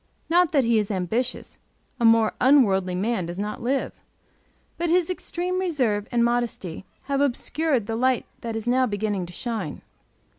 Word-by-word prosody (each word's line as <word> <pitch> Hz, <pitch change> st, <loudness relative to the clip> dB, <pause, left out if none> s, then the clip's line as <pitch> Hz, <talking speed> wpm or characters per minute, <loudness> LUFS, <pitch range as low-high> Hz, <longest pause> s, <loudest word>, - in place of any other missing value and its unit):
Not 350 Hz, -1 st, +4 dB
that 280 Hz, -4 st, +3 dB
he 230 Hz, -1 st, +3 dB
is 210 Hz, -, -2 dB
ambitious; 220 Hz, +6 st, -2 dB, 0.4 s
a 235 Hz, -, +2 dB
more 225 Hz, -1 st, +5 dB
unworldly 195 Hz, -9 st, +4 dB
man 195 Hz, -1 st, -1 dB
does 175 Hz, +1 st, -6 dB
not 210 Hz, +1 st, -4 dB
live; 260 Hz, +3 st, -1 dB, 0.9 s
but 345 Hz, 0 st, 0 dB
his 355 Hz, +1 st, +2 dB
extreme 365 Hz, 0 st, -3 dB
reserve 255 Hz, -, 0 dB
and 235 Hz, -1 st, +3 dB
modesty 235 Hz, -7 st, -2 dB, 0.2 s
have 280 Hz, 0 st, -1 dB
obscured 285 Hz, -1 st, 0 dB
the 225 Hz, -, -3 dB
light 255 Hz, +1 st, +1 dB
that 230 Hz, -1 st, -5 dB
is 225 Hz, 0 st, -4 dB
now 255 Hz, +1 st, +3 dB
beginning 205 Hz, -3 st, -2 dB
to 175 Hz, -, -11 dB
shine. 230 Hz, +3 st, -4 dB
235 Hz, 160 wpm, -24 LUFS, 210-275 Hz, 0.9 s, more